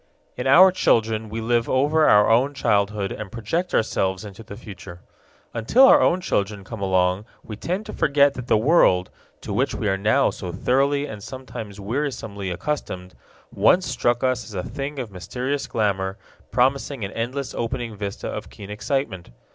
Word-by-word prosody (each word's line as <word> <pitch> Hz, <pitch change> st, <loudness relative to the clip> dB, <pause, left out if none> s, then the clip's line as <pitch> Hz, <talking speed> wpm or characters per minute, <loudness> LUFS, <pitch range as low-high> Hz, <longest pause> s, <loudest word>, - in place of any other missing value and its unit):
In 125 Hz, -, -3 dB
our 185 Hz, +8 st, +8 dB
children 110 Hz, -10 st, +1 dB
we 115 Hz, +2 st, -4 dB
live 120 Hz, +1 st, +1 dB
over 150 Hz, +4 st, +3 dB
our 105 Hz, 0 st, +6 dB
own 130 Hz, +5 st, +3 dB
childhood 100 Hz, -4 st, 0 dB
and 105 Hz, -2 st, -6 dB
project 120 Hz, -, -2 dB
ourselves 95 Hz, -2 st, 0 dB
into 100 Hz, +1 st, -10 dB
the 100 Hz, -2 st, -10 dB
future. 90 Hz, -4 st, -11 dB, 0.5 s
Until 120 Hz, -, +4 dB
our 285 Hz, +2 st, +7 dB
own 180 Hz, +2 st, +2 dB
children 100 Hz, -, -1 dB
come 100 Hz, +2 st, -8 dB
along 95 Hz, +1 st, +1 dB, 0.2 s
we 110 Hz, -, -7 dB
tend 185 Hz, -, -3 dB
to 215 Hz, -, -8 dB
forget 140 Hz, -1 st, +3 dB
that 125 Hz, -2 st, -7 dB
the -, -, +4 dB
world, 105 Hz, -, +3 dB, 0.3 s
to -, -, -5 dB
which -, -, 0 dB
we -, -, -2 dB
are 95 Hz, -1 st, 0 dB
now 110 Hz, +7 st, +3 dB
so 90 Hz, -3 st, -6 dB
thoroughly 140 Hz, +9 st, +1 dB
and 105 Hz, -7 st, -8 dB
sometimes 110 Hz, -4 st, -8 dB
wearisomely 110 Hz, -4 st, -3 dB
accustomed, 90 Hz, -3 st, -4 dB, 0.4 s
once 175 Hz, -, +4 dB
struck 120 Hz, -2 st, 0 dB
us 130 Hz, -2 st, +1 dB
as 110 Hz, -, -11 dB
a 90 Hz, -, -2 dB
thing 140 Hz, +1 st, -5 dB
of 125 Hz, -5 st, -5 dB
mysterious 125 Hz, +10 st, -3 dB
glamour, 100 Hz, -3 st, -1 dB, 0.3 s
promising 130 Hz, -2 st, 0 dB
an 95 Hz, -, -7 dB
endless 125 Hz, +4 st, -4 dB
opening 120 Hz, -1 st, -3 dB
vista 100 Hz, -1 st, -5 dB
of -, -, -6 dB
keen 100 Hz, 0 st, -10 dB
excitement. 105 Hz, -4 st, -3 dB
115 Hz, 170 wpm, -23 LUFS, 100-135 Hz, 0.5 s, our